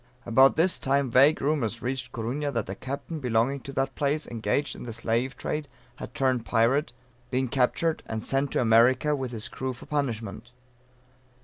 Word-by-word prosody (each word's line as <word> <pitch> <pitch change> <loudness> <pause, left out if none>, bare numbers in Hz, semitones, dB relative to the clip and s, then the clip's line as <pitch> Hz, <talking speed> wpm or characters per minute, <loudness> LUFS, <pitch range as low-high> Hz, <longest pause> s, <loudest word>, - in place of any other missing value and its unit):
About 130 +3 +5
this 175 +3 +3
time 135 -1 +1
vague 140 +6 +5
rumors 130 -6 -1
reached 130 0 -3
Corunna, 130 +6 -3
that 115 -3 -2
a 95 - -4
Captain 140 - -6
belonging 125 +1 +1
to 135 +1 -9
that 135 0 -1
place, 145 +2 -1
engaged 115 +5 -2
in - - -10
the 115 - -6
Slave 115 +3 -1
Trade, 150 -1 -3 0.3
had - - -9
turned 130 -5 +1
Pirate, 120 +6 +2 0.4
been 130 0 0
captured, 140 +6 +1
and 110 -1 -4
sent 135 0 0
to - - +2
America 125 +6 +4
with 130 -2 -3
his 115 -3 -3
crew 130 0 -4
for 120 - -12
punishment. 120 -6 -3
130 Hz, 175 wpm, -27 LUFS, 115-140 Hz, 0.4 s, About